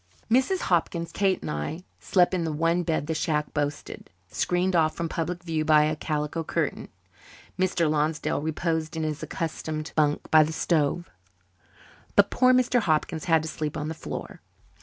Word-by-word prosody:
Mrs. 265 Hz, +10 st, +3 dB
Hopkins, 170 Hz, -1 st, 0 dB
Kate, 195 Hz, -2 st, +1 dB
and -, -, -3 dB
I 110 Hz, -, -4 dB, 0.2 s
slept 180 Hz, -1 st, +2 dB
in 180 Hz, -2 st, 0 dB
the 160 Hz, -, -1 dB
one 165 Hz, +3 st, +1 dB
bed 160 Hz, -4 st, -1 dB
the 160 Hz, -, -2 dB
shack 150 Hz, -1 st, -1 dB
boasted, 145 Hz, -1 st, -4 dB, 0.2 s
screened 180 Hz, +1 st, 0 dB
off 155 Hz, -2 st, +3 dB
from 170 Hz, -, -2 dB
public 170 Hz, +2 st, -3 dB
view 160 Hz, -2 st, -1 dB
by 155 Hz, -1 st, +5 dB
a 155 Hz, 0 st, 0 dB
calico 150 Hz, +1 st, -2 dB
curtain. -, -, -2 dB, 0.7 s
Mr. 180 Hz, -3 st, +2 dB
Lonsdale 150 Hz, 0 st, 0 dB
reposed 160 Hz, +1 st, -2 dB
in 160 Hz, -, -1 dB
his 155 Hz, 0 st, -3 dB
accustomed 155 Hz, -1 st, -4 dB
bunk 150 Hz, -1 st, +1 dB
by 155 Hz, -, +8 dB
the 155 Hz, +1 st, 0 dB
stove, 165 Hz, +1 st, 0 dB, 1.0 s
but -, -, +5 dB
poor 255 Hz, 0 st, +4 dB
Mr. 255 Hz, -1 st, +3 dB
Hopkins 160 Hz, -4 st, 0 dB
had 165 Hz, -3 st, +3 dB
to -, -, -4 dB
sleep 155 Hz, -1 st, -4 dB
on 150 Hz, 0 st, -3 dB
the -, -, -3 dB
floor. 160 Hz, -, -7 dB
160 Hz, 170 wpm, -26 LUFS, 155-175 Hz, 1.0 s, by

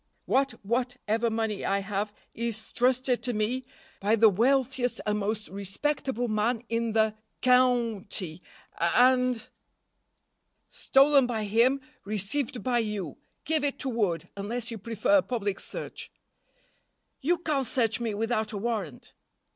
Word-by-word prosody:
"What 270 Hz, -1 st, +2 dB
what 245 Hz, +3 st, -1 dB
ever 225 Hz, +2 st, +1 dB
money 220 Hz, -2 st, -2 dB
I 200 Hz, 0 st, +1 dB
have 205 Hz, +1 st, -2 dB, 0.2 s
is 225 Hz, -1 st, -4 dB
trusted 250 Hz, 0 st, +2 dB
to 245 Hz, -, -1 dB
me 235 Hz, +4 st, -1 dB, 0.3 s
by 210 Hz, +3 st, +2 dB
the 225 Hz, 0 st, +6 dB
wealthiest 250 Hz, +4 st, +1 dB
and 210 Hz, 0 st, 0 dB
most 210 Hz, +1 st, -2 dB
respectable 240 Hz, +5 st, -2 dB
man 220 Hz, +2 st, 0 dB
in 230 Hz, -1 st, -1 dB
the 220 Hz, -1 st, +3 dB, 0.3 s
cou 250 Hz, -4 st, +3 dB
nty, 180 Hz, -4 st, -3 dB, 0.4 s
and 250 Hz, +6 st, +3 dB, 0.6 s
" -, -, -50 dB
"Stolen 275 Hz, -1 st, +5 dB
by 225 Hz, -3 st, -2 dB
him, 235 Hz, +6 st, +3 dB, 0.2 s
received 215 Hz, +4 st, -1 dB
by 245 Hz, -2 st, +1 dB
you! 210 Hz, -, -3 dB, 0.3 s
Give 310 Hz, -1 st, +1 dB
it 285 Hz, -1 st, -1 dB
to 270 Hz, -, -3 dB
Wood, 205 Hz, -9 st, -1 dB
unless 230 Hz, +4 st, -2 dB
you 225 Hz, -, -6 dB
prefer 225 Hz, +7 st, +2 dB
a -, -, +4 dB
public 205 Hz, -7 st, -2 dB
search." -, -, -5 dB, 1.1 s
"You 345 Hz, +6 st, +1 dB
can't 295 Hz, -7 st, -1 dB
search 225 Hz, -2 st, +1 dB
me 230 Hz, -3 st, -2 dB
without 220 Hz, 0 st, -1 dB
a -, -, -3 dB
warrant." 200 Hz, -, -4 dB
230 Hz, 140 wpm, -28 LUFS, 210-255 Hz, 1.1 s, the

